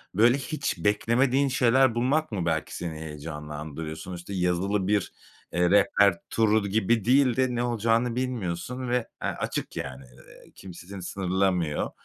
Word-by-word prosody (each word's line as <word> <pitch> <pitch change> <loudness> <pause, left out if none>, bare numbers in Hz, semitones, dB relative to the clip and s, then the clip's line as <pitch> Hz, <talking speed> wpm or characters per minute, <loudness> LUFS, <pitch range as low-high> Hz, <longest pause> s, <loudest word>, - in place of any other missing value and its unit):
böyle 120 +6 +5
hiç 145 +1 -3
beklemediğin 125 +6 +2
şeyler 130 -1 +3
bulmak 135 +6 +1
mı 95 -5 -2
belki 80 -2 -1
seni 80 -3 -5
heyecanlandırıyor? 75 0 -6
Sonuçta 90 +3 -8
yazılı 95 +2 0
bir, 105 -1 0 0.4
eee, 90 0 +2
rehber 100 -1 +4
turu 110 -2 +2
gibi 110 +1 +1
değil 130 -1 +4
de 130 -1 +1
ne 120 - 0
olacağını 115 0 +1
bilmiyorsun 125 0 -3
ve, 120 - +2 0.3
eee, - - -1
açık, - - -4
yani. 65 0 -5
Eee, 60 -1 -18
kimse 90 -2 -11
seni 100 -1 -8
sınırlamıyor 90 -4 0
100 Hz, 145 wpm, -26 LUFS, 85-120 Hz, 0.4 s, böyle